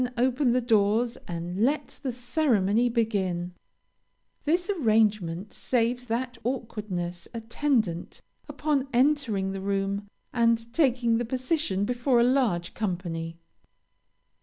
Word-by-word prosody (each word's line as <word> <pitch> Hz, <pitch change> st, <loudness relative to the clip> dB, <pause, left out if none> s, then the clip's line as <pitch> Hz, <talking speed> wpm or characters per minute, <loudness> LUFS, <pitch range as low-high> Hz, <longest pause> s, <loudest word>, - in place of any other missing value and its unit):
Then 250 Hz, 0 st, -3 dB
open 255 Hz, +1 st, +2 dB
the 255 Hz, -, +2 dB
doors 230 Hz, +1 st, +2 dB
and 175 Hz, +3 st, -3 dB
let 285 Hz, +5 st, 0 dB
the 265 Hz, -, -2 dB
ceremony 245 Hz, -3 st, +2 dB
begin. 190 Hz, -7 st, -1 dB, 0.9 s
This 345 Hz, +4 st, +1 dB
arrangement 215 Hz, -, +1 dB
saves 245 Hz, 0 st, 0 dB
that 245 Hz, +2 st, -2 dB
awkwardness 210 Hz, -8 st, -3 dB
attendant 225 Hz, -, -1 dB, 0.3 s
upon 285 Hz, -3 st, 0 dB
entering 245 Hz, -7 st, +2 dB
the 195 Hz, 0 st, -5 dB
room 200 Hz, +1 st, -1 dB, 0.3 s
and 230 Hz, -1 st, +2 dB
taking 245 Hz, -6 st, +3 dB
the 240 Hz, -, -1 dB
position 255 Hz, -, 0 dB
before 245 Hz, +2 st, +2 dB
a -, -, +5 dB
large 240 Hz, -10 st, +1 dB
company. 170 Hz, -5 st, -3 dB
230 Hz, 110 wpm, -27 LUFS, 195-255 Hz, 0.9 s, a